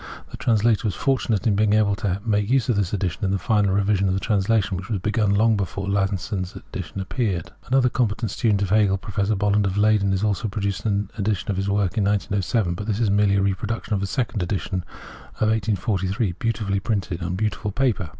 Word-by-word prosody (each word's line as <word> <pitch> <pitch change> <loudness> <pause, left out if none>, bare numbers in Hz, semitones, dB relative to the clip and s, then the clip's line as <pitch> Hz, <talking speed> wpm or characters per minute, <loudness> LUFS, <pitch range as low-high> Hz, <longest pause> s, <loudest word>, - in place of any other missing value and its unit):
The - - -7
translator 110 -1 +2
was 100 - -2
fortunate 125 -6 0
in 110 - +3
being 105 0 +3
able 105 -1 +3
to 100 -4 -1
make 105 -2 +1
use 130 -1 +2
of 120 - +3
this 100 -3 0
edition 100 +1 -2
in 95 - +1
the 100 - +1
final 105 0 +1
revision 100 0 +2
of 95 - +1
the - - 0
translation, 105 0 +1
which 95 +3 -6
was 110 - 0
begun 105 +1 +1
long 110 +2 +4
bef^)re 100 -1 -3
Lasson's 95 -1 -1
edition - - -7
appeared. 95 -1 -2 0.2
Another 130 0 +3
competent 115 -3 0
studcint 105 -3 +1
of 95 - -2
Hegel, 100 -2 +4
Professor 100 +1 -1
Bolland 105 0 +2
of 95 +1 -2
Leyden, 105 -2 +3
also 105 +2 0
produced 100 0 -2
an 100 -1 -1
edition 100 -1 -1
of 95 - -3
the 100 - -1
work 100 +1 0
in - - +2
1907; 100 -1 0
but 100 +4 -6
this 105 -1 -1
is 110 -4 +2
merely 100 -1 +3
a 100 - +2
repro 100 +2 -1
duction 115 +1 -4
of 105 - +2
the 100 - -2
second 110 0 -2
edition 95 0 -2 0.5
of 110 - +1
1843, 100 -1 0
beautifully 105 -4 -1
printed 95 -3 -2
on 90 +1 -2
beautiful 105 +1 -2
paper. 105 -6 0
100 Hz, 210 wpm, -23 LUFS, 95-110 Hz, 0.5 s, long